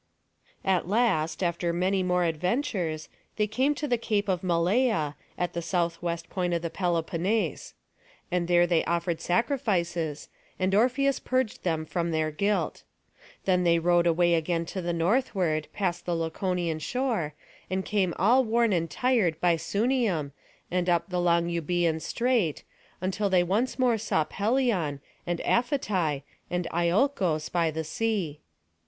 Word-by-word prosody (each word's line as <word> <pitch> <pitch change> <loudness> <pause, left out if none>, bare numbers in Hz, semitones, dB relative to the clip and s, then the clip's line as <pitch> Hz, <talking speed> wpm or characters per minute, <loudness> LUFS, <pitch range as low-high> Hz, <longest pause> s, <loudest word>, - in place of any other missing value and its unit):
At 185 -3 +1
last, 190 -7 +1
after 170 0 0
many 185 +3 +1
more 180 -1 +1
adventures, 170 - -1 0.3
they 210 - +2
came 260 +8 +1
to 300 - -3
the 245 -3 +1
Cape 210 -3 0
of 180 -2 +1
Malea, 180 - +1 0.2
at 180 - -2
the 170 - -2
southwest 170 -1 -2
point 180 -2 -1
of 170 - -2
the 170 - -3
Peloponnese. 175 - -1 0.6
And 175 -1 0
there 175 0 +5
they 170 -2 +2
offered 170 -1 -1
sacrifices, 175 - 0 0.3
and 185 +1 0
Orpheus 255 +6 +3
purged 255 -4 -1
them 160 -3 -1
from 170 +1 -2
their 160 -1 0
guilt. 200 +7 -1 0.6
Then 180 -1 +3
they 170 -1 +4
rowed 175 +1 +3
away 170 +1 +3
again 165 +1 0
to 190 - -3
the 175 0 -2
northward, 170 - +1
past 180 -4 -2
the 175 - +1
Laconian 165 0 -1
shore, 225 - -1 0.3
and 190 0 -1
came 195 -5 0
all 240 +8 +4
worn 230 -1 +2
and 165 -2 0
tired 225 -11 +1
by 175 -1 +3
Sunium, 200 - 0 0.4
and 180 0 0
up 175 +2 +1
the 180 -1 0
long 170 -1 +3
Eubœan 170 -1 0
Strait, 235 - 0 0.4
until 195 +2 0
they 185 -2 +4
saw - - 0
once 215 +8 0
more 250 -3 +3
Pelion, 200 - 0 0.3
and 175 -1 -1
Aphetai, 195 - 0 0.3
and 180 -1 -1
Iolcos 175 - +1
by 170 -2 +2
the 160 +1 -3
sea. 180 -3 -2
180 Hz, 150 wpm, -27 LUFS, 170-210 Hz, 0.6 s, there